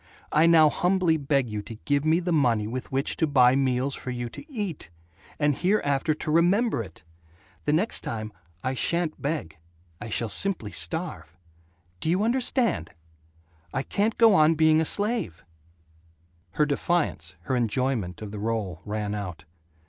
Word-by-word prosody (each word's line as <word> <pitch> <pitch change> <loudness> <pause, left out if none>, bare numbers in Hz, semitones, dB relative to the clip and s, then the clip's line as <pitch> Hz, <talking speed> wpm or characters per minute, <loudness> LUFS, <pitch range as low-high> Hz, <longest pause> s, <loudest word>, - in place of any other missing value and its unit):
I 160 +2 +4
now 160 -2 +6
humbly 180 -1 +2
beg 140 -3 0
you 105 -2 -4
to 110 +2 -9
give 145 0 +1
me 160 +2 +3
the 180 0 -2
money 120 -9 +2
with 125 +4 -6
which 135 +2 0
to 160 - +1
buy 130 -3 +5
meals 135 0 0
for 130 - -7
you 120 -1 -4
to 295 - -12
eat. 205 - -5 0.5
And 145 -2 +1
hereafter 155 -6 +1
to 155 - -4
remember 180 - +2
it. 85 -7 -12 0.6
The 150 - +1
next 190 +9 +2
time, 110 -2 -5 0.3
I 130 - -1
sha'n't 170 +4 -1
beg. 140 - -4 0.4
I 120 - -6
shall 115 +2 -1
simply 115 - +2
starve. 85 +1 -1 0.6
Do 160 - -2
you 185 +5 +2
understand? 235 - 0 0.8
I 135 - 0
can't 210 +7 -1
go 225 -2 +6
on 160 -2 +5
being 155 0 +4
a - - 0
slave 205 - -1 0.6
" 85 +2 -36
Her 150 - +2
defiance, 160 +3 -1
her 130 - -2
enjoyment 115 -5 -1
of 105 - -7
the 105 - -6
role, 105 -5 -3
ran 105 -1 -3
out. 90 -6 -6
140 Hz, 165 wpm, -26 LUFS, 110-170 Hz, 0.8 s, now